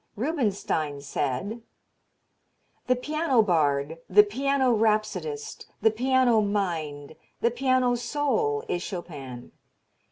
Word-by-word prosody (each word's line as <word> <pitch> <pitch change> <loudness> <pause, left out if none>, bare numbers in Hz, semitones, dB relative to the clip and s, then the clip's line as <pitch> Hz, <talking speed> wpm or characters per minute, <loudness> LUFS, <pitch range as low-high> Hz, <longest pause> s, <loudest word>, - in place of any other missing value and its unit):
Rubinstein 205 - -1
said: 145 - -3 1.3
The 255 - +4
piano 280 -2 +1
bard, 155 -4 +1
the 210 +2 +7
piano 265 +4 +1
rhapsodist, 225 - -1
the 220 - +4
piano 250 0 +3
mind, 160 -8 -2 0.3
the 235 - +3
piano 255 0 +2
soul 295 - 0
is 175 - -2
Chopin. 145 - -7
220 Hz, 95 wpm, -26 LUFS, 165-260 Hz, 1.3 s, the